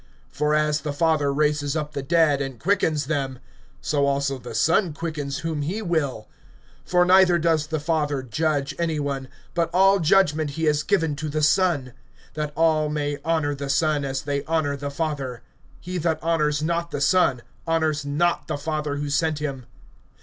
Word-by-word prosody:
(21)For 150 Hz, +1 st, +2 dB
as 150 Hz, -1 st, +1 dB
the 150 Hz, -1 st, -3 dB
Father 150 Hz, -2 st, +2 dB
raises 150 Hz, 0 st, 0 dB
up 150 Hz, -1 st, -3 dB
the 140 Hz, -, -3 dB
dead, 155 Hz, -1 st, +3 dB
and 135 Hz, -4 st, -5 dB
quickens 160 Hz, -6 st, +1 dB
them; 135 Hz, -3 st, -2 dB, 0.4 s
so 140 Hz, -2 st, +1 dB
also 140 Hz, -1 st, 0 dB
the 120 Hz, -2 st, -8 dB
Son 165 Hz, -, +2 dB
quickens 150 Hz, -4 st, -4 dB
whom 160 Hz, -2 st, -2 dB
he 175 Hz, +9 st, -2 dB
will. 155 Hz, -, -2 dB, 0.6 s
(22)For 180 Hz, 0 st, +3 dB
neither 185 Hz, -1 st, +5 dB
does 160 Hz, -2 st, +1 dB
the 155 Hz, 0 st, -2 dB
Father 150 Hz, -3 st, -1 dB
judge 145 Hz, +3 st, -1 dB
any 165 Hz, -3 st, 0 dB
one; 140 Hz, -2 st, -3 dB, 0.3 s
but 170 Hz, -2 st, 0 dB
all 195 Hz, +2 st, +4 dB
judgment 160 Hz, -3 st, +3 dB
he 160 Hz, -, -2 dB
has 150 Hz, -1 st, +2 dB
given 165 Hz, -5 st, +1 dB
to 150 Hz, +2 st, -4 dB
the 155 Hz, +1 st, -1 dB
Son; 150 Hz, -5 st, +2 dB, 0.4 s
(23)that 150 Hz, -1 st, -3 dB
all 155 Hz, -2 st, +2 dB
may 145 Hz, -1 st, -2 dB
honor 160 Hz, -3 st, 0 dB
the 140 Hz, 0 st, -5 dB
Son, 150 Hz, +1 st, +1 dB
as 135 Hz, -1 st, -3 dB
they 140 Hz, -1 st, -2 dB
honor 155 Hz, -3 st, 0 dB
the 140 Hz, 0 st, -5 dB
Father. 140 Hz, -5 st, -4 dB, 0.4 s
He 180 Hz, +1 st, -5 dB
that 160 Hz, -1 st, 0 dB
honors 155 Hz, -3 st, +1 dB
not 170 Hz, +1 st, -1 dB
the 145 Hz, -, -4 dB
Son, 140 Hz, -5 st, +2 dB, 0.2 s
honors 160 Hz, -2 st, +1 dB
not 150 Hz, +1 st, 0 dB
the -, -, -2 dB
Father 150 Hz, 0 st, -3 dB
who 145 Hz, 0 st, -3 dB
sent 155 Hz, +1 st, +1 dB
him. 140 Hz, -4 st, -5 dB
150 Hz, 180 wpm, -24 LUFS, 140-165 Hz, 0.6 s, neither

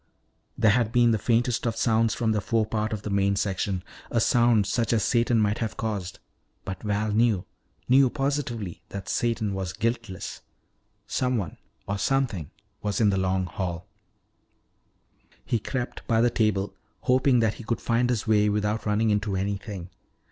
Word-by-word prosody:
There 110 Hz, -2 st, +5 dB
had 115 Hz, -1 st, +2 dB
been 120 Hz, -1 st, +4 dB
the 110 Hz, -, +1 dB
faintest 120 Hz, +2 st, +1 dB
of 115 Hz, -, -1 dB
sounds 115 Hz, -1 st, +2 dB
from 115 Hz, -2 st, +1 dB
the 105 Hz, -1 st, +1 dB
forepart 110 Hz, +1 st, 0 dB
of 105 Hz, -2 st, -4 dB
the 105 Hz, -, -4 dB
main 100 Hz, 0 st, +2 dB
section, 95 Hz, -2 st, -1 dB, 0.3 s
a 115 Hz, -, +1 dB
sound 120 Hz, -2 st, +4 dB
such 115 Hz, +3 st, 0 dB
as 110 Hz, -, +2 dB
Satan 120 Hz, -1 st, +2 dB
might 105 Hz, +1 st, +1 dB
have 110 Hz, -2 st, -3 dB
caused. 100 Hz, -5 st, -3 dB, 0.5 s
But 95 Hz, -, -5 dB
Val 105 Hz, 0 st, -1 dB
knew 110 Hz, -3 st, +2 dB, 0.4 s
knew 130 Hz, +1 st, +6 dB
positively 135 Hz, -, -2 dB
that 100 Hz, -2 st, -7 dB
Satan 115 Hz, -4 st, 0 dB
was 95 Hz, -2 st, -3 dB
guiltless. 115 Hz, -4 st, -3 dB, 0.6 s
Someone 125 Hz, -9 st, -1 dB, 0.3 s
or 100 Hz, 0 st, -2 dB
something 120 Hz, -, 0 dB, 0.3 s
was 105 Hz, -1 st, -1 dB
in 105 Hz, -3 st, +4 dB
the 95 Hz, -, 0 dB
Long 95 Hz, 0 st, +1 dB
Hall. 90 Hz, 0 st, -4 dB, 1.6 s
He 115 Hz, -, 0 dB
crept 125 Hz, +3 st, -4 dB
by 115 Hz, -1 st, +3 dB
the 120 Hz, +1 st, +4 dB
table, 100 Hz, -3 st, +1 dB, 0.3 s
hoping 130 Hz, 0 st, +3 dB
that 110 Hz, -1 st, +2 dB
he 115 Hz, -, -10 dB
could 115 Hz, +1 st, -2 dB
find 120 Hz, +1 st, +1 dB
his 120 Hz, -4 st, 0 dB
way 105 Hz, -1 st, +3 dB
without 105 Hz, +1 st, -1 dB
running 105 Hz, +1 st, +2 dB
into 105 Hz, -1 st, 0 dB
anything. 95 Hz, -1 st, -4 dB
110 Hz, 160 wpm, -26 LUFS, 100-120 Hz, 1.6 s, knew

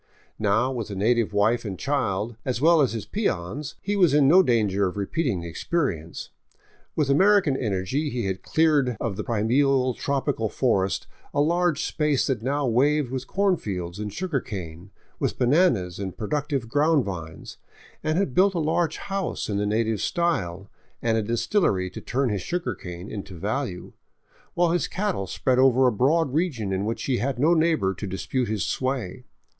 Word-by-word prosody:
Now, 110 Hz, +5 st, +2 dB
with 115 Hz, -5 st, -4 dB
a 100 Hz, -, -5 dB
native 115 Hz, +3 st, +1 dB
wife 110 Hz, +4 st, +2 dB
and 100 Hz, -4 st, -5 dB
child, 115 Hz, -3 st, -1 dB
as 125 Hz, -3 st, -2 dB
well 165 Hz, +2 st, +5 dB
as 130 Hz, -5 st, +2 dB
his 115 Hz, -, -4 dB
peons, 145 Hz, -, -3 dB
he 205 Hz, +1 st, -1 dB
was 175 Hz, -8 st, +4 dB
in 145 Hz, -2 st, +5 dB
no 180 Hz, +6 st, +7 dB
danger 105 Hz, -, +2 dB
of 90 Hz, -, -6 dB
repeating 105 Hz, -, -1 dB
the 85 Hz, -1 st, -7 dB
expe -, -, -9 dB
rience. 85 Hz, -, -5 dB, 0.7 s
With 145 Hz, -3 st, +1 dB
American 190 Hz, -1 st, +4 dB
energy 115 Hz, +6 st, -1 dB
he 120 Hz, -5 st, -3 dB
had 95 Hz, -1 st, -3 dB
cleared 145 Hz, -6 st, +2 dB
of 115 Hz, -5 st, -2 dB
the -, -, -4 dB
primeval, 130 Hz, +4 st, +2 dB
tropical 135 Hz, -4 st, -1 dB
forest 100 Hz, -7 st, 0 dB, 0.3 s
a -, -, +2 dB
large 170 Hz, 0 st, +2 dB
space 150 Hz, -4 st, +1 dB
that 130 Hz, -5 st, -1 dB
now 140 Hz, +4 st, 0 dB
waved 135 Hz, +3 st, +2 dB
with 130 Hz, -1 st, -4 dB
corn 195 Hz, -2 st, +2 dB
fields 90 Hz, -, -5 dB
and 105 Hz, -1 st, -4 dB
sugar 170 Hz, -, -2 dB
cane, 90 Hz, -2 st, -7 dB, 0.3 s
with -, -, -1 dB
bananas 125 Hz, -, +2 dB
and 95 Hz, -2 st, -5 dB
productive 135 Hz, +2 st, -2 dB
ground 145 Hz, +2 st, +2 dB
vines, 80 Hz, -5 st, -7 dB, 0.4 s
and 155 Hz, +1 st, 0 dB
had 190 Hz, -9 st, 0 dB
built 190 Hz, +4 st, +4 dB
a -, -, +1 dB
large 160 Hz, +1 st, 0 dB
house 195 Hz, -, -3 dB
in 100 Hz, -, -1 dB
the 105 Hz, 0 st, 0 dB
native 110 Hz, 0 st, 0 dB
style 100 Hz, -, -1 dB, 0.4 s
and 115 Hz, -1 st, +2 dB
a 110 Hz, -, +2 dB
distillery 105 Hz, -, 0 dB
to -, -, -8 dB
turn 130 Hz, +1 st, -1 dB
his 100 Hz, -3 st, -2 dB
sugar 170 Hz, -, -2 dB
cane 90 Hz, +1 st, -8 dB
into 100 Hz, -3 st, -7 dB
value, 105 Hz, -, -3 dB, 0.6 s
while 175 Hz, -1 st, +3 dB
his 175 Hz, -, +1 dB
cattle 190 Hz, -, -2 dB
spread 125 Hz, +7 st, 0 dB
over 130 Hz, 0 st, +5 dB
a 125 Hz, -, +4 dB
broad 140 Hz, +6 st, +2 dB
region 135 Hz, -, -1 dB
in 95 Hz, +2 st, -1 dB
which 115 Hz, +2 st, -3 dB
he 130 Hz, -3 st, 0 dB
had 130 Hz, +3 st, -1 dB
no 155 Hz, +7 st, +4 dB
neighbor 160 Hz, -, +2 dB
to 100 Hz, +2 st, -6 dB
dispute 120 Hz, +6 st, -2 dB
his 105 Hz, -4 st, -1 dB
sway. 130 Hz, -2 st, -3 dB
125 Hz, 180 wpm, -25 LUFS, 100-150 Hz, 0.7 s, no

